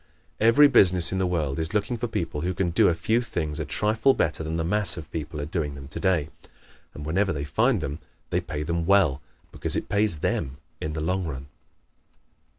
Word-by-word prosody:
Every 115 +7 +6
business 90 -9 +5
in 95 - -1
the 95 - +1
world 80 -5 -1
is 80 +4 -2
looking 105 +4 0
for 120 +1 -3
people 85 -8 -3
who 90 +1 -2
can 90 -1 0
do - - +4
a 85 - +2
few 115 +7 +1
things 80 -9 -3
a 75 - -2
trifle 110 - +2
better 80 0 -1
than 80 +1 -3
the 80 - -1
mass 105 +4 -1
of 75 -3 -9
people 75 -1 -5
are 75 - -3
doing 75 -3 -3
them 70 -1 -10
today, 80 0 0 0.7
and 75 - -7
whenever 95 +5 +1
they 70 -4 -3
find 110 - +1
them 70 0 -4 0.3
they - - +1
pay 75 0 -5
them 85 +1 -2
well 90 -9 +3 0.3
because - - +1
it - - -3
pays 100 -7 +2
THEM 65 +1 -1 0.2
in 75 - -3
the 80 0 -3
long 90 +1 -1
run. 70 -2 -7
85 Hz, 210 wpm, -25 LUFS, 75-100 Hz, 0.7 s, Every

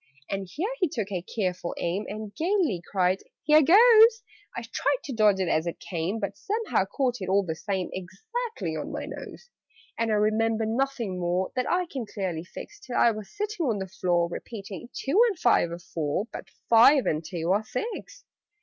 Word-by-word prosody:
And 195 -1 -3
here 390 - -2
he 360 -5 +2
took 215 -7 -4
a 185 -3 -2
careful 180 -3 -3
aim, 180 +5 -2
And 210 0 -6
gaily 330 - 0
cried 185 -1 +2 0.2
"Here 305 0 +6
goes!" 450 - +7 0.3
I - - -3
tried - - 0
to 275 - -5
dodge 210 -4 +4
it 185 - 0
as 160 +1 +1
it 170 - -4
came, 175 +4 -3
But 200 -1 -3
somehow 415 - -1
caught 250 +5 -1
it, 185 - -4
all 200 +1 +3
the 160 - -2
same, 185 +2 -3
Exactly 445 - -5
on - - -4
my - - -4
nose. 485 - -9 0.5
And 230 0 +1
I 215 - +2
remember 220 +1 +2
nothing 230 -4 -1
more 180 +1 0
That 255 -1 -1
I 360 +1 +2
can 265 -9 -6
clearly 185 -6 -3
fix, 410 - -10
Till 330 -12 -5
I 235 - +5
was 215 -2 -7
sitting 415 -6 -3
on 225 -4 +1
the 190 -1 -4
floor, 175 -2 +1
Repeating 195 +3 -8
"Two 340 +11 +1
and 395 - -4
five 235 - +3
are 170 - -4
four, 165 +1 -2
But - - -8 0.2
five 245 +4 +6
and 155 +1 0
two 170 +1 -2
are 205 +3 +2
six." 475 - -6
215 Hz, 195 wpm, -27 LUFS, 185-305 Hz, 0.5 s, goes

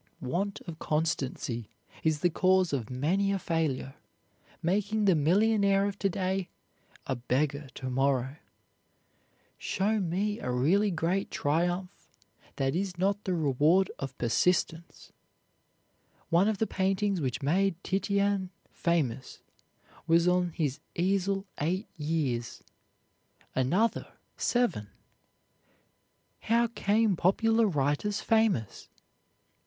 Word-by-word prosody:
Want 185 +10 -2
of 165 -2 -9
constancy 135 -7 -2 0.3
is 155 -2 0
the 175 - +2
cause 185 -1 +2
of 120 -6 -2
many 170 +10 0
a 200 - +1
failure, 160 -7 -2 0.7
making 205 +4 +1
the 190 - +5
millionaire 200 +5 +3
of 205 0 -4
to 195 - +1
day 190 0 -2 0.6
a 130 - -1
beggar 135 +4 -1
to 130 - -6
morrow. 135 +1 0 1.2
Show 210 +3 0
me 200 +4 -1
a - - -4
really 165 +12 +2
great 175 +2 -1
triumph 175 +5 0 0.6
that 135 +1 0
is 185 -1 -2
not 200 +3 0
the 185 -2 0
reward 155 +5 +3
of 135 -1 -6
persistence. 165 +6 0 1.2
One 175 +4 +4
of 215 -2 0
the 220 - +1
paintings 195 -1 0
which 130 0 -2
made 185 +6 +2
Titian 200 0 0 0.2
famous 140 -7 -2 0.6
was 170 +1 +4
on 180 0 +2
his 145 -4 -2 0.2
easel 195 +2 0
eight 180 +8 -1
years; 145 -7 -2 0.9
another, 180 - +1 0.2
seven. 240 - 0 1.5
How 235 +1 +2
came 220 -2 +1
popular 225 +6 +3
writers 150 +5 0
famous? 220 - 0
180 Hz, 110 wpm, -29 LUFS, 145-200 Hz, 1.5 s, the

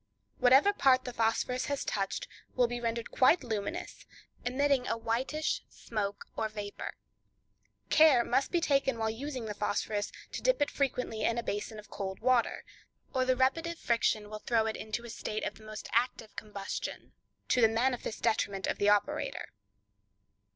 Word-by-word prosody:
Whatever 270 +11 +6
part 260 -8 +4
the 250 - -5
phosphorus 230 +2 0
has 285 -1 -2
touched 200 - -2 0.3
will 250 - +4
be 240 0 -3
rendered 230 0 -2
quite 265 +5 +4
luminous, 230 - -4 0.4
emitting 260 +1 +1
a - - 0
whitish 250 +7 -1
smoke 205 -3 -4
or 220 - -1
vapor. 205 -1 -6 1.0
Care 305 -6 +7
must 275 - +1
be 350 - +3
taken 275 -5 +2
while 220 -1 0
using 255 +1 -5
the 210 - -3
phosphorus, 205 0 -1 0.2
to - - -5
dip - - +3
it 290 - +1
frequently 250 -5 -1
in 230 - +1
a 235 - -1
basin 210 +1 -3
of 210 -1 -12
cold 190 -2 -4
water, 250 0 +2 0.5
or 260 -1 +2
the 255 0 +3
repeative 330 +7 +1
friction 230 -4 +1
will 215 - -5
throw 225 0 +1
it 220 - -1
into 220 +2 -4
a - - -8
state 215 0 -4
of - - -2
the - - -15
most 215 0 -7
active 235 -1 0
combustion, 205 -2 -5 0.4
to 250 - +3
the 225 - +8
manifest 230 0 -1
detriment 200 -4 +1
of - - -2
the 205 - +4
operator. 205 -1 0
235 Hz, 165 wpm, -31 LUFS, 215-265 Hz, 1.0 s, the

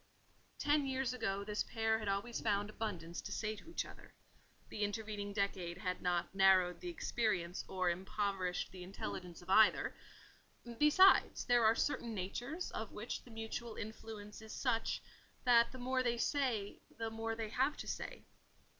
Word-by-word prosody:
Ten 290 -1 +2
years 260 -2 0
ago 200 -5 -1
this 210 +1 -2
pair 225 -1 +1
had 215 - -5
always 200 +4 -1
found 205 -1 +1
abundance 175 -7 -4
to - - -7
say 215 0 -1
to 215 - -13
each 335 - -2
other; - - -13 0.5
the 210 - -6
intervening 205 -1 -2
decade 195 -4 -1
had 180 0 -3
not 175 -1 0
narrowed 190 -2 +5
the 360 - -4
experience 210 - -1
or 185 -1 -1
impoverished 190 0 -2
the 185 - -9
intelligence 180 -1 -6
of 175 - -15
either: 220 +2 +5 0.9
besides, 370 +6 +6
there 245 -2 +4
are 220 +1 +6
certain 235 -5 -1
natures 245 - -3
of 220 -2 -4
which 215 +3 -4
the - - -15
mutual 225 0 -5
influence 215 -1 -7
is 220 0 -9
such, 230 -4 0 0.4
that 235 -2 +6
the 260 - -9
more 255 +1 0
they 240 -1 +1
say, 235 -6 0 0.2
the 225 0 -3
more 225 0 -2
they 225 -1 -3
have 265 +6 +1
to - - -6
say. - - -5
220 Hz, 165 wpm, -36 LUFS, 195-240 Hz, 0.9 s, besides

